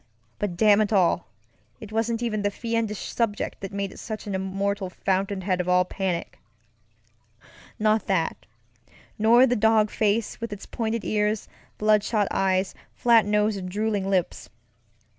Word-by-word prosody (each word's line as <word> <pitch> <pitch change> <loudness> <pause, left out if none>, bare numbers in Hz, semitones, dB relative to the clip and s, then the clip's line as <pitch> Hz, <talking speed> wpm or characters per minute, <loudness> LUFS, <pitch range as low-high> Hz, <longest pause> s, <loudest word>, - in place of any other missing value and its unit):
But, 190 -4 -3
damn 210 +1 +5
it 215 - 0
all, 190 -5 +2 0.5
it 215 -3 -10
wasn't 230 +1 -1
even 215 -3 -1
the 205 - +1
fiendish 230 -1 -3
subject 225 -3 -1
that 195 - -5
made 200 -1 -3
it - - -12
such 215 -2 -6
an 205 - -4
immortal 195 +1 -2
fountain 190 +1 -1
head 185 -1 0
of 180 - -4
all 180 0 +4
panicŌĆönot 180 -2 -2 1.8
that, 175 -5 -1 0.7
nor 235 +4 +6
the 245 -1 +1
dog 220 -1 +3
face 215 +2 0
with 230 -1 -4
its 205 -1 -7
pointed 225 -1 -3
ears, 210 0 0 0.3
bloodshot 210 -1 +2
eyes, 190 0 +1 0.2
flat 230 -3 +4
nose, 210 0 +2
and 185 -1 -5
drooling 205 0 -1
lips. 185 -3 -1
205 Hz, 145 wpm, -25 LUFS, 195-220 Hz, 1.8 s, nor